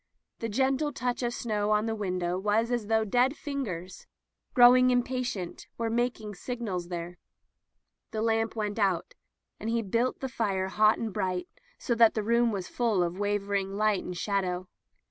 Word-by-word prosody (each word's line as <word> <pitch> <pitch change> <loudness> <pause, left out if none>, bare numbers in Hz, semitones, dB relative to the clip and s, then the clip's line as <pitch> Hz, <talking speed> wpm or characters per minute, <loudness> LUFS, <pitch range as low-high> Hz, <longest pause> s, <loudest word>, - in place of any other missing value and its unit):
The 230 - -3
gende 270 +6 +1
touch 245 -1 -1
of 240 -1 0
snow 210 -3 -1
on 210 0 +3
the 225 - -1
window 180 -4 -2
was 215 +4 +1
as 240 -4 -1
though 220 0 +2
dead 250 +7 +2
fingers, 195 - -5 0.5
growing 255 0 +7
impatient, 245 -7 -2
were 230 -1 -1
mak 240 +1 0
ing 210 -1 -7
signals 200 -4 -4
there. 175 0 -6 0.9
The 220 0 -2
lamp 225 0 +1
went 210 -1 -2
out, 195 - +1 0.5
and 220 - -3
he 230 0 +1
built 230 +5 0
the 265 - -3
fire 195 -6 -1
hot 215 +2 +4
and 220 -3 -4
bright, 180 -1 -1 0.3
so 240 - -1
that 230 -1 +5
the 215 - 0
room 235 +2 +3
was 190 -4 -3
full 225 -7 +1
of 175 +2 -3
wavering 200 -1 -1
light 215 -2 +2
and 180 -1 -6
shadow. 185 -2 -1
215 Hz, 170 wpm, -29 LUFS, 190-240 Hz, 0.9 s, growing